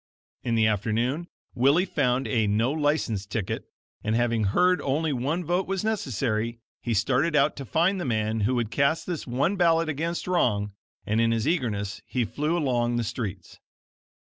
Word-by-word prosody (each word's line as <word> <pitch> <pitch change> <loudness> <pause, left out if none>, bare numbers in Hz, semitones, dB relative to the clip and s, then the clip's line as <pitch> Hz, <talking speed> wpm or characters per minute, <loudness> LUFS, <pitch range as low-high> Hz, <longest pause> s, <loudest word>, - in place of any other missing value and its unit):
In 115 -2 -1
the 110 -1 +4
afternoon, 115 - 0 0.3
Willie 140 +9 +3
found 135 -7 0
a 110 -5 +1
No 110 +5 +2
License 145 -10 0
ticket, 100 -2 -3 0.4
and, 110 +1 0
having 115 -2 +1
heard 180 - +3
only 150 +3 0
one 145 +8 -1
vote 175 +3 0
was 195 0 -2
necessary, 115 - -1 0.2
he 120 -2 -1
started 135 +9 +1
out 145 0 +3
to 140 - -6
find 175 - +1
the - - -2
man 110 -3 0
who 115 +5 +1
would 115 -3 -1
cast 140 +5 +1
this 175 -6 -4
one 140 +11 0
ballot 165 -2 +3
against 165 +3 -2
wrong, 105 - +1 0.3
and 110 +2 +1
in 115 - +3
his 115 +3 0
eagerness 110 - -1
he 125 -2 0
flew 150 +8 -1
along 120 -6 +1
the 120 - 0
streets. 100 -5 -5
125 Hz, 170 wpm, -26 LUFS, 110-160 Hz, 0.4 s, the